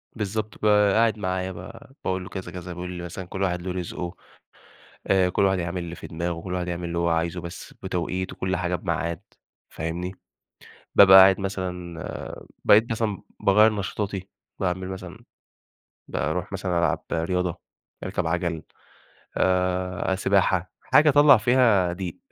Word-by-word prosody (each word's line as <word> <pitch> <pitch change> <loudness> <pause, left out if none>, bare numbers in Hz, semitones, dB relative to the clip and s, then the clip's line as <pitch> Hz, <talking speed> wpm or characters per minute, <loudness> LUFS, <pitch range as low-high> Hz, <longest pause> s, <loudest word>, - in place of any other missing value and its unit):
بالضبط، 110 0 -3
ب - - -2
قاعد 105 +1 +4
معايا 95 -1 -2
بقى، 115 +8 -11
باقول 95 -1 -1
له: - - -9
"كذا، 95 -2 -6
كذا،" 90 -1 -7
بيقول 90 +1 -6
لي 90 -1 -6
مثلًا: 90 +2 -6
"كلّ 95 +2 -6
واحد 90 -2 0
له 90 +1 -4
رزقه، 90 0 -5 0.9
آآ 95 -2 +3
كلّ - - 0
واحد 95 -1 +2
يعمل 85 +1 -3
اللي 85 0 -7
في - - -9
دماغه، 85 0 -3
كلّ 90 +1 -5
واحد 90 -1 -2
يعمل 85 0 -4
اللي 85 - -3
هو 85 0 +1
عايزه، 85 +1 -1
بس 85 0 -9
بتوقيت، 95 0 -2
وكلّ 95 0 -2
حاجة 90 0 -1
بميعاد،" 85 -2 -2 0.5
فاهمني، 85 +3 -4 0.8
بابقى 95 -1 +9
قاعد 95 0 +7
مثلًا، 90 -3 -5 0.4
بقيت 110 +3 +5
مثلًا 110 -3 -1 0.2
باغيّر 105 +2 +5
نشاطاتي، 100 -1 -4 0.3
باعمل 95 0 -2
مثلًا 95 0 -7 0.9
باروح 85 +5 -2
مثلًا 95 -3 -1
ألعب 85 - 0
رياضة، 90 +1 -1 0.4
أركب 90 -2 -2
عجل، 85 -1 -1 0.7
آآ، 90 0 +1
سباحة 95 -2 +1
حاجة 150 +1 +4
أطلّع 145 -1 +7
فيها 110 -6 +3
ضِيق، 90 -1 -5
90 Hz, 150 wpm, -25 LUFS, 90-95 Hz, 0.9 s, بابقى